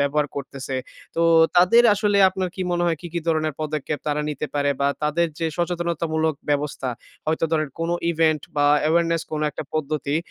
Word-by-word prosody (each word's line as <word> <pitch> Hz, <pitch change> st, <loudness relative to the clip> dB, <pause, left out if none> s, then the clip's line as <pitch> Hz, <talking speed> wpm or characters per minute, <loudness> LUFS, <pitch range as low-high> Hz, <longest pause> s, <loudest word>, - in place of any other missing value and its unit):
ব্যবহার 145 Hz, +1 st, +1 dB
করতেছে। 135 Hz, -1 st, -5 dB, 0.4 s
তো 165 Hz, -, +2 dB, 0.3 s
তাদের 185 Hz, +7 st, +6 dB
আসলে 205 Hz, -1 st, +1 dB
আপনার 185 Hz, -1 st, -2 dB
কি 185 Hz, -, -3 dB
মনে 175 Hz, 0 st, 0 dB
হয় 165 Hz, -1 st, +1 dB
কি, 175 Hz, -, -7 dB
কি 170 Hz, -, -1 dB
ধরনের 155 Hz, -2 st, 0 dB
পদক্ষেপ 150 Hz, -1 st, -3 dB
তারা 150 Hz, 0 st, 0 dB
নিতে 150 Hz, +1 st, -4 dB
পারে 145 Hz, 0 st, +1 dB
বা 140 Hz, -, +3 dB
তাদের 155 Hz, +3 st, +2 dB
যে 165 Hz, -, 0 dB
সচেতনতামূলক 165 Hz, -3 st, -1 dB, 0.2 s
ব্যবস্থা 145 Hz, -2 st, -1 dB, 0.4 s
হয়তো 160 Hz, +1 st, +1 dB
ধরেন, 155 Hz, -2 st, +1 dB
কোন 165 Hz, +1 st, -1 dB, 0.2 s
ইভেন্ট 160 Hz, -2 st, +2 dB
বা 145 Hz, -, +3 dB, 0.2 s
awareness 165 Hz, 0 st, +2 dB
কোনো 155 Hz, 0 st, -1 dB
একটা 145 Hz, -, -6 dB
পদ্ধতি 150 Hz, -1 st, -1 dB
155 Hz, 175 wpm, -23 LUFS, 150-170 Hz, 0.4 s, তাদের